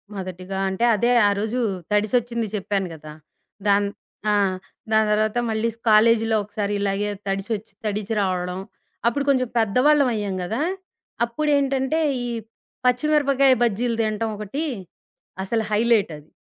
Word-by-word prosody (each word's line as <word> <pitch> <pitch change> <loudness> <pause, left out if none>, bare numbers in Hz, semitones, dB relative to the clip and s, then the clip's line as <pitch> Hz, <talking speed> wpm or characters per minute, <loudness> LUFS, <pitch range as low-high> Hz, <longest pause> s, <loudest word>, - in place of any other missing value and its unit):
మొదటిగా 185 0 -6
అంటే 190 +5 0
అదే 235 +4 +2 0.2
ఆరోజు 215 +4 -1 0.3
తడిసొచ్చింది 230 +2 +1
చెప్పాను 195 -1 -1
గదా! 155 -1 -10 0.5
దాన్ 200 0 +4 0.4
ఆ! - - +3 0.6
దాని 220 0 +4
తర్వాత 215 +2 +1
మళ్ళీ 220 +1 0 0.2
కాలేజీలో 225 +1 +5
ఒకసారి 205 0 -3
ఇలాగే 200 +1 0 0.2
తడిసొచ్చి 195 +2 -3
తడిచి 210 +1 -2
రావడం, 180 -1 -1 0.5
అప్పుడు 280 +4 +1
కొంచెం 255 -3 +2
పెద్దవాళ్ళం 255 +6 +4
అయ్యాం 205 -3 -2
గదా! 225 +10 -2 0.6
అప్పుడేంటంటే, 275 +3 +1 0.3
ఈ - - -3 0.6
పచ్చిమిరపకాయ 275 +1 +3
బజ్జీలు 235 +1 0
తినటం 220 0 -1
ఒకటి, 215 +9 -4 0.8
అసలు 225 +3 -1
హైలైటది. 210 -9 +1
220 Hz, 115 wpm, -23 LUFS, 200-245 Hz, 0.8 s, కాలేజీలో